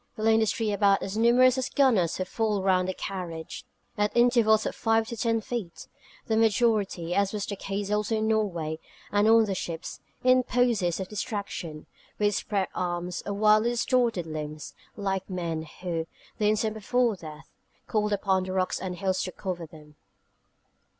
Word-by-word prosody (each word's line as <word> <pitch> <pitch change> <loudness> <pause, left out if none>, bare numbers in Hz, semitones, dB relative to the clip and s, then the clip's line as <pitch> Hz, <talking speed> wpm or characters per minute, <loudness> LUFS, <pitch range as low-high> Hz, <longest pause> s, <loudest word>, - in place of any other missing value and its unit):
They 215 - -4
lay 225 0 +5
in 220 - +4
the 220 - +2
street 215 0 0
about 200 -1 +3
as 195 +1 -4
numerous 245 +3 +5
as 260 - -2
gunners 225 - +2
who 185 - -2
fall 210 -1 -1
round 185 -1 +2
their 185 - -3
carriage, 180 +4 -6 0.3
at 210 +2 +1
intervals 235 -3 +4
of - - -2
five 225 -1 +1
to 235 - -4
ten 230 0 0
feet, 215 -7 -5 0.4
the 220 - 0
majority 210 -6 +2
as 200 +1 +1
was 205 -1 -2
the 200 - -4
case 200 +1 -4
also 210 +1 0
in 215 0 0
Norway, 175 -8 -1 0.3
and 205 +1 +3
on 225 0 +6
the 200 - -2
ships 170 -3 -5 0.2
in 255 0 +5
poses 235 -9 +1
of 190 - -4
distraction, 200 -8 -5 0.3
with 210 0 +2
spread 200 -2 -1
arms, 175 0 -3
or 200 - -1
wildly 215 +2 +4
distorted 240 -5 +1
limbs, 155 -1 -6 0.2
like 195 -2 -2
men 165 -3 -3
who, 165 -3 -2 0.3
the 210 -1 +3
instant 215 0 +1
before 230 +2 +1
death, 155 -3 -11 0.3
called 210 -1 0
upon 190 -2 +1
the 185 - -4
rocks 185 -1 0
and 185 -1 -4
hills 185 +1 -1
to 185 - -3
cover 175 -3 -5
them. 150 -1 -16
205 Hz, 175 wpm, -27 LUFS, 180-220 Hz, 0.4 s, on